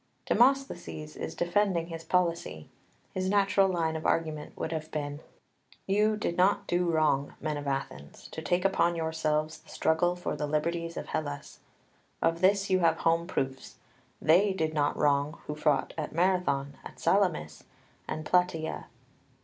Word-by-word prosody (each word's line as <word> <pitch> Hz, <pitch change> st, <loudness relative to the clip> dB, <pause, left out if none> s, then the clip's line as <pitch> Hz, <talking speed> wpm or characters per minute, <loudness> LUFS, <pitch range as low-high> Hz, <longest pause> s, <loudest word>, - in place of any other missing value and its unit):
2 -, -, +1 dB
Demosthenes 235 Hz, -, +1 dB
is -, -, -5 dB
defending 175 Hz, -1 st, +1 dB
his 165 Hz, -1 st, -6 dB
policy; 170 Hz, -, -1 dB, 0.5 s
his 185 Hz, 0 st, -1 dB
natural 195 Hz, -1 st, +3 dB
line 165 Hz, -3 st, 0 dB
of 160 Hz, -, -4 dB
argument 155 Hz, -2 st, -1 dB
would -, -, -3 dB
have 160 Hz, -1 st, -4 dB
been: 145 Hz, -1 st, -4 dB, 0.7 s
"You 210 Hz, +2 st, +2 dB
did 170 Hz, -5 st, -2 dB
not 190 Hz, +3 st, +3 dB
do 175 Hz, 0 st, +1 dB
wrong, 155 Hz, -4 st, +1 dB
men 155 Hz, 0 st, -2 dB
of 145 Hz, -1 st, -5 dB
Athens, 135 Hz, -, -5 dB
to 160 Hz, -, -6 dB
take 175 Hz, +3 st, 0 dB
upon 175 Hz, -3 st, +2 dB
yourselves 160 Hz, -1 st, -1 dB
the -, -, -22 dB
struggle 175 Hz, +2 st, +1 dB
for 175 Hz, -, -3 dB
the 150 Hz, -, -2 dB
liberties 165 Hz, +3 st, -1 dB
of -, -, -5 dB
Hellas. 145 Hz, -2 st, -4 dB, 0.6 s
Of 165 Hz, +1 st, +1 dB
this 200 Hz, +1 st, +3 dB
you 185 Hz, -1 st, +3 dB
have 165 Hz, -2 st, +3 dB
home 165 Hz, +1 st, +1 dB
proofs. 135 Hz, -6 st, -3 dB, 0.4 s
They 185 Hz, +6 st, +4 dB
did 160 Hz, -4 st, -1 dB
not 145 Hz, -2 st, +1 dB
wrong 145 Hz, +1 st, +2 dB
who 150 Hz, -, -4 dB
fought 150 Hz, -2 st, +1 dB
at 150 Hz, -, -4 dB
Marathon, 165 Hz, -6 st, +1 dB
at -, -, -11 dB
Salamis, 175 Hz, -, +1 dB, 0.4 s
and 155 Hz, -, -4 dB
Plataea." 170 Hz, -3 st, 0 dB
165 Hz, 155 wpm, -29 LUFS, 150-180 Hz, 0.7 s, They